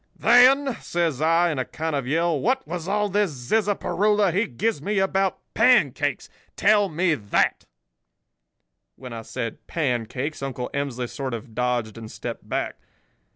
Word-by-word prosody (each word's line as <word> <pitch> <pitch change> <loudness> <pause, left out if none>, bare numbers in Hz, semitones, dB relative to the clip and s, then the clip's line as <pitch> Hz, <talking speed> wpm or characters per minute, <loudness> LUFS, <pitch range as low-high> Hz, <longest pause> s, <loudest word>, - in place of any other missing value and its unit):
"'Then,' 255 +3 +5
says 165 -5 -1
I, 165 +2 +3
in 145 - -3
a - - +1
kind 160 -1 -3
of 135 -3 -2
yell, 165 +1 +1
'what 260 - 0
was 175 0 -5
all 210 +1 +1
this 205 0 +1
zizzaparoola 205 - +1
he 205 +5 +1
gives 170 - -2
me 205 +6 -2
about 190 -1 +1 0.2
pancakes? 155 - +3 0.3
Tell 205 -1 +3
me 170 +1 +1
that.' 105 -8 0 1.3
"When 125 -2 -9
I 115 - -6
said 115 0 -6
'pancakes' 130 0 -2
Uncle 130 -2 -4
Emsley 135 -3 -2
sort 130 -1 -4
of 115 0 -10
dodged 120 -2 -1
and 110 -1 -9
stepped - - -7
back. - - -2
160 Hz, 150 wpm, -24 LUFS, 125-205 Hz, 1.3 s, Then